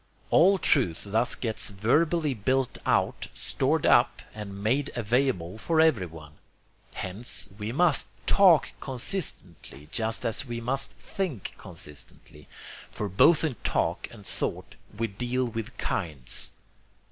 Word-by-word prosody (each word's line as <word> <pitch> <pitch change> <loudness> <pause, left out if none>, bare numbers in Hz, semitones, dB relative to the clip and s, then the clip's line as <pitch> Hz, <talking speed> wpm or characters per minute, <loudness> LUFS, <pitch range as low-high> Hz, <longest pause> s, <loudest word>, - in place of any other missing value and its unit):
All 195 +3 +6
truth 125 - +3
thus 110 +4 +1
gets 110 -6 -1
verbally 150 - +1
built 130 +3 0
out, - - +1
stored - - 0
up, - - +4
and 100 -2 -7
made 135 +6 +1
available 115 -5 0
for 160 +7 +1
everyone. 90 - +1 0.6
Hence, 100 +3 -1
we 105 +2 -3
must 155 +2 +4 0.2
TALK 185 -6 +5
consistently 120 - -5
just 110 0 -1
as 115 - +1
we 120 -3 -5
must 135 +4 0
THINK 170 - -4
consistently: 75 -4 -10 0.4
for 105 - -4
both 140 - +5
in 145 -8 -1
talk - - 0
and 105 -4 -14
thought - - -3 0.2
we 115 - 0
deal 120 +5 -2
with 115 +1 -6
kinds. 75 - -1
115 Hz, 125 wpm, -27 LUFS, 100-140 Hz, 0.6 s, All